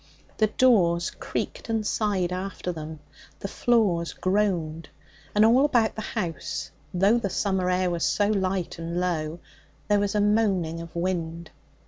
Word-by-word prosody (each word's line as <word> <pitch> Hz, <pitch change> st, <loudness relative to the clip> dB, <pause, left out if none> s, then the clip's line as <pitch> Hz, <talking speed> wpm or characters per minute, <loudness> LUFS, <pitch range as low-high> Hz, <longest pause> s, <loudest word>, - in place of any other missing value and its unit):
The 215 Hz, -, +4 dB
doors 185 Hz, -8 st, +3 dB
creaked -, -, -5 dB
and 225 Hz, -1 st, 0 dB
sighed 195 Hz, -5 st, 0 dB
after 185 Hz, -1 st, -4 dB
them, 155 Hz, -2 st, -7 dB, 0.4 s
the -, -, -4 dB
floors 195 Hz, -7 st, +1 dB
groaned, 175 Hz, -5 st, 0 dB, 0.5 s
and 210 Hz, +1 st, +6 dB
all 245 Hz, +5 st, +5 dB
about 240 Hz, -6 st, +3 dB
the 220 Hz, -, -5 dB
house, 185 Hz, -7 st, -4 dB, 0.2 s
though 195 Hz, +6 st, +3 dB
the 200 Hz, -, -2 dB
summer 190 Hz, -1 st, 0 dB
air 180 Hz, 0 st, +1 dB
was 170 Hz, -1 st, -2 dB
so 205 Hz, 0 st, +2 dB
light 190 Hz, -4 st, -1 dB
and 170 Hz, +1 st, -3 dB
low, 165 Hz, -3 st, -1 dB, 0.5 s
there 205 Hz, 0 st, +4 dB
was 205 Hz, 0 st, -1 dB
a -, -, +3 dB
moaning 200 Hz, -6 st, +1 dB
of 170 Hz, 0 st, -10 dB
wind. 170 Hz, -2 st, -3 dB
185 Hz, 150 wpm, -26 LUFS, 170-210 Hz, 0.5 s, and